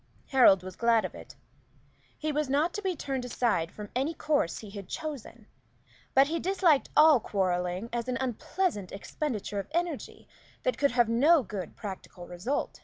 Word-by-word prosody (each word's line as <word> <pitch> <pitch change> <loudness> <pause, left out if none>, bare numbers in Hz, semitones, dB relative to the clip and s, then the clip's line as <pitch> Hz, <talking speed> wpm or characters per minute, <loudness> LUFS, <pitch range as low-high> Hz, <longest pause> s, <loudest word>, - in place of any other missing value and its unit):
Harold 220 -9 +6
was 185 -1 -8
glad 230 -1 +3
of - - -6
it. - - -12 0.8
He 310 0 -2
was 300 -1 -1
not 300 +5 +1
to 415 - -4
be 380 -3 -1
turned 270 -4 -3
aside 220 -9 0
from 210 -1 -9
any 280 +6 0
course 295 - 0
he 210 -3 -9
had 200 -2 -9
chosen; 265 -7 -6 0.7
but 270 +1 +7
he 325 +3 -2
disliked 360 -6 +2
all 305 -3 +8
quarrelling 185 -1 -1
as 240 0 -2
an 255 0 -1
unpleasant 260 - -2
expenditure 210 -1 -4
of 195 - -5
energy 340 -4 -3 0.4
that - - 0
could 280 - +4
have 240 -2 +4
no 280 +7 +4
good 190 -4 -6
practical 190 -3 -8
result. 180 +11 -3
245 Hz, 170 wpm, -29 LUFS, 200-300 Hz, 0.8 s, all